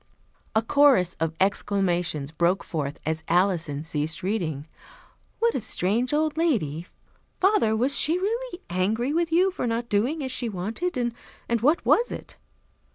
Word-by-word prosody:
A 220 - +3
chorus 255 - +4
of 160 0 -1
exclamations 180 -7 0
broke 170 +4 +1
forth 145 -3 -4
as 160 +1 -2
Alison 170 -5 +1
ceased 155 0 -2
reading. 170 -8 -2 0.7
"What 465 0 +2
a - - -2
strange 215 +7 0
old 305 0 0
lady! 180 - 0 0.5
Father, 370 - +3
was 255 +5 +1
she 325 +3 +2
really 440 +1 -3
angry 220 +9 0
with 335 0 0
you 365 +4 +4
for 360 - -3
not 235 +1 -2
doing 255 +10 0
as 260 - -3
she 245 -2 -1
wanted? 220 - -3
And 235 -1 -4
what 295 +7 +2
was 475 - +3
it?" - - -8
220 Hz, 150 wpm, -25 LUFS, -, 0.7 s, chorus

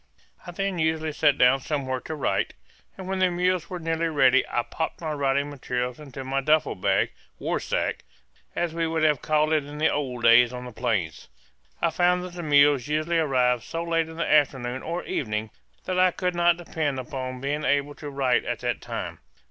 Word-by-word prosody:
I - - -5
then 195 0 -2
usually 160 0 0
sat 145 -1 +2
down 125 +2 +5
somewhere 135 -2 -2
to 160 - -6
write, 145 - -1 0.4
and 190 -1 -7
when 190 0 -2
the 185 -1 +4
mules 180 0 0
were 180 - -4
nearly 165 0 -1
ready 135 -4 +4
I 120 - 0
popped 160 +6 -4
my 160 -2 -3
writing 140 0 0
materials 125 -2 -3
into 135 -3 -8
my 135 +1 -1
duffel 155 +2 +2
bag/war 95 +1 -1
sack, - - -2 0.5
as 175 -2 -1
we 165 0 0
would 160 -1 -1
have 150 -3 +3
called 155 0 +2
it 155 -2 +2
in 145 +1 -9
the 155 +1 +2
old 125 -5 -3
days 115 +1 +6
on 125 0 -6
the 125 - -8
plains. 110 -9 -2 0.6
I 170 - +3
found 180 +1 +2
that 180 -1 -8
the 175 - -6
mules 145 -4 +4
usually 155 +3 0
arrived 125 -5 +2
so 165 +7 -4
late 165 -1 0
in 160 - -10
the 165 - 0
afternoon 130 -4 +2
or 170 +2 -4
evening 110 -3 -3 0.3
that 185 0 -1
I 185 0 +6
could 180 0 -2
not 175 0 +3
depend 155 -5 -2
upon 130 0 -5
being 145 +3 -2
able 145 0 +1
to 145 0 -8
write 135 -3 +1
at - - -3
that - - -2
time. - - -5
150 Hz, 200 wpm, -25 LUFS, 130-165 Hz, 0.6 s, days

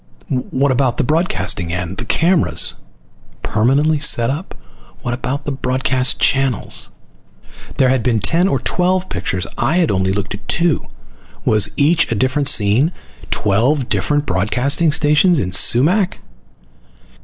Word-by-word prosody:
What 135 +1 0
about 130 -1 0
the - - 0
broadcasting 150 - -1
end, 90 +1 -5
the - - -6
cameras? 165 +7 +2 0.7
Permanently 140 +9 +1
set 120 -4 +3
up? 155 +7 -7 0.5
What 120 - -3
about 130 +3 -4
the 145 - -3
broadcast 130 0 0
channels? 135 -4 -1 0.9
There 130 -2 +3
had 130 -1 +1
been 120 -1 0
ten 170 - +2
or 135 - 0
twelve 180 +7 -1
pictures. 90 -1 -3
I'd 160 +7 +1
only 95 -1 0
looked 100 -1 -3
at 100 - -11
two. 170 -2 0 0.6
Was 105 -2 +3
each 160 +2 +2
a - - 0
different 130 +5 0
scene? 115 - +3 0.4
Twelve 120 +7 0
different 145 0 -1
broadcasting 125 - 0
stations 150 +4 +3
in 95 -8 -2
Sumac? 165 - +3
130 Hz, 130 wpm, -17 LUFS, 110-155 Hz, 0.9 s, set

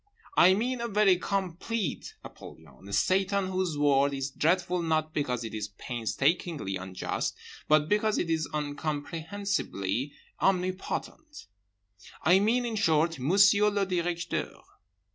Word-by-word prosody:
I 185 +2 +6
mean 245 +4 -1
a 235 - -2
very 205 -4 +4
complete 195 0 -3
Apollyon, 80 +3 -13
a - - -9
Satan 195 - +1
whose 185 -4 -1
word 140 -1 +3
is 135 0 -3
dreadful 175 +4 +1
not 155 -1 0
because 125 -5 -1
it 110 - -6
is 105 -1 -3
painstakingly 135 - -1
unjust, 95 0 -3 0.3
but 155 0 +4
because 210 +2 +1
it - - -1
is 160 -1 -1
incomprehensibly 150 - -3 0.3
omnipotent. 195 - -2 0.8
I 180 +3 +5
mean, 235 +5 +2
in 230 -2 -3
short, 165 -5 +2
Monsieur 200 +8 +5
le 200 -1 0
Directeur. 175 -2 -3
170 Hz, 125 wpm, -28 LUFS, 145-195 Hz, 0.8 s, I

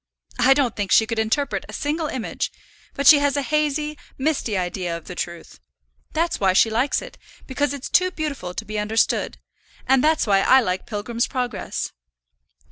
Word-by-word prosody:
I 260 +3 +5
don't 265 -5 +1
think 205 -2 -3
she 220 - +6
could 225 0 -3
interpret 220 +6 0
a - - -9
single 310 +2 -2
image, 255 -5 -3 0.4
but 280 - -2
she 295 0 +9
has 285 0 +1
a 285 - 0
hazy, 300 0 -1 0.2
misty 265 -7 -1
idea 175 -1 -2
of 165 - -14
the 180 - -7
truth. 170 - -6 0.5
That's 330 +2 0
why 190 -2 +3
she 220 +4 +4
likes 245 - +1
it, - - -12 0.3
because 285 +1 -1
it's 280 -1 -5
too 365 0 +3
beautiful 280 - -5
to - - -5
be 215 +1 -4
understood; 215 +2 0 0.5
and 265 0 +3
that's 315 +1 +3
why 200 -3 +3
I 260 +6 +6
like 185 -6 -2
Pilgrim's 230 +2 -2
Progress." 250 -2 -3
255 Hz, 180 wpm, -22 LUFS, 210-290 Hz, 0.5 s, she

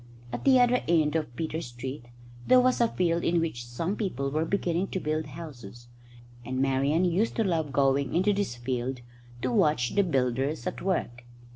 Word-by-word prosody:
At 120 - -5
the 265 -2 +6
other 245 0 +4
end 160 -2 +2
of 150 -7 -2
Peter 160 +2 -3
Street 125 -1 -7 0.4
there 255 - +7
was 255 -1 +3
a 235 - +5
field 170 -5 0
in 170 0 +2
which 120 -8 -3
some 165 +11 -2
people 140 - -2
were 155 +3 0
beginning 180 0 0
to 190 - -3
build 155 -2 -2
houses, 120 -7 -10 0.5
and 130 +2 -3
Marian 135 +5 +2
used 180 +6 +1
to 225 - +2
love 165 -7 -1
going 135 +1 +1
into 190 +4 +3
this 200 -11 -2
field 125 +1 -3 0.4
to 130 - 0
watch 125 -1 +2
the 205 - +4
builders 135 -2 0
at 180 - -4
work. 120 -10 -2
155 Hz, 180 wpm, -28 LUFS, 130-180 Hz, 0.5 s, there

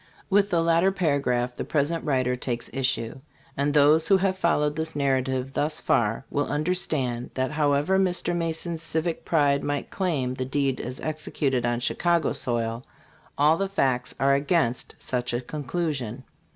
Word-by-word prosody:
With 200 +1 +4
the 170 -3 +2
latter 170 +3 +3
paragraph 140 -9 0
the - - -5
present 160 +2 0
writer 130 -4 +1
takes 120 -1 -4
issue; 130 -3 -1 0.4
and 140 +1 +1
those 150 +2 +5
who 195 - +5
have 190 0 +1
followed 150 -5 +1
this 160 0 -3
narrative 130 -1 0
thus 150 +2 0
far 115 +3 +1
will 145 - 0
understand 145 -6 -1
that 130 +1 -1
however 150 +4 +2
Mr. 180 -2 +1
Ma 165 -1 0
son's 165 0 -4
civic 165 0 -2
pride 145 -3 +2
might 145 -1 -3
claim 150 -10 -1
the 130 - -3
deed 135 0 0
as 125 +1 -5
executed 140 -5 -1
on 120 0 -1
Chicago's 160 0 +1
soil, 115 -1 -2 0.5
all 150 +3 +4
the 195 +1 -1
facts 130 -10 0
are 140 +1 +4
against 140 -3 0
such 125 -1 -3
a 120 - -1
conclusion. 140 -3 -3
145 Hz, 160 wpm, -25 LUFS, 130-165 Hz, 0.5 s, those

